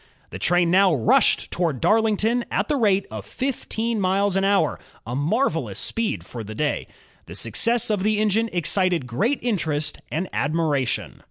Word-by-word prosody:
The - - -7
train 175 -1 +2
now 190 -2 +4
rushed 115 - +2
toward 165 -7 -1
Darlington 225 - +2
at - - -1
the 295 - +2
rate 200 -6 +2
of 110 -2 -6
fifteen 230 - -3
miles 195 +1 +1
an 195 - +1
hour, 195 -6 +2 0.3
a 120 +2 -4
marvelous 190 - 0
speed 230 -2 -2
for 115 -2 -7
the 110 +1 -8
day. 150 +4 -1 0.4
The 85 - -9
success 220 - +2
of 205 -3 0
the 215 +2 +1
engine 215 +2 +1
excited 175 -2 +1
great 210 - 0
interest 155 -10 -1
and 175 +4 -2
admiration. 145 -4 -1
185 Hz, 160 wpm, -23 LUFS, 150-220 Hz, 0.4 s, now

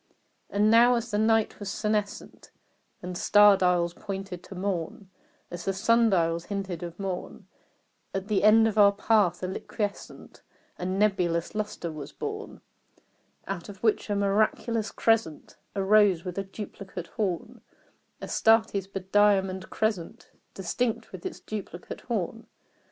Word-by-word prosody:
And 210 +1 +3
now 240 +2 +6
as 235 0 -3
the 205 - 0
night 225 0 +2
was 205 -2 -5
senescent 210 0 -3 0.5
And 180 0 -5
star 205 +2 +6
dials 180 -2 +1
pointed 195 -2 -6
to 195 - -10
morn 185 0 -4 0.4
As 175 0 -7
the 195 - 0
sun 230 +4 +3
dials 170 -3 +1
hinted 195 -4 -4
of 170 -1 -7
morn 190 -2 -5 0.7
At 195 0 -4
the 210 -2 +1
end 225 +1 +6
of 215 -1 0
our 200 -1 +7
path 200 -4 +2
a - - 0
liquescent 205 +2 -6 0.4
And 185 +2 -2
nebulous 180 -5 +1
lustre 210 -5 -4
was 150 -3 -8
born, - - -6 0.8
Out 190 -1 -5
of 195 0 -11
which 220 -1 +1
a 205 - 0
miraculous 215 +2 +1
crescent 225 -9 0 0.2
Arose 195 -3 +4
with 180 +1 -4
a - - -1
duplicate 195 -2 -8
horn 190 -4 -4 0.6
Astarte's 220 -4 +2
bediamonded 195 -1 +1
crescent 215 -6 -3 0.2
Distinct 225 +5 -2
with 185 -2 -6
its - - -8
duplicate 200 -4 -7
horn. 225 -1 -3
200 Hz, 135 wpm, -27 LUFS, 180-215 Hz, 0.8 s, our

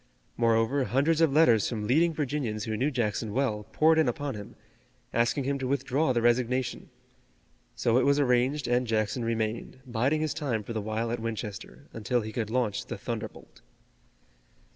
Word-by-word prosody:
Moreover, 115 +3 +2
hundreds 140 +9 +2
of 160 -3 +4
letters 130 -8 +4
from 110 -3 -3
leading 160 +9 +3
Virginians 135 -8 -2
who 110 0 -2
knew 130 +7 +1
Jackson 115 -4 -2
well 110 -5 -1
poured 160 +4 +4
in 155 -6 +3
upon 140 +3 -3
him, 105 -2 -9 0.6
asking 120 +4 +1
him 140 +1 -1
to 130 - -2
withdraw 135 +2 +1
the 120 -2 0
resignation. 125 +1 0 0.9
So 120 +2 +2
it - - +2
was 140 +1 +3
arranged 130 +2 +2
and 120 +1 +1
Jackson 110 +2 0
remained, 115 +2 -2
biding 130 +5 0
his 155 -2 -1
time 130 -9 -2
for 115 - -6
the 110 - -2
while 110 +2 -2
at 120 - -2
Winchester, 110 +3 -6
until 120 +2 -1
he 110 0 -6
could 110 -3 -2
launch 125 0 -1
the - - -5
thunderbolt. 115 -2 -7
120 Hz, 170 wpm, -28 LUFS, 110-140 Hz, 0.9 s, of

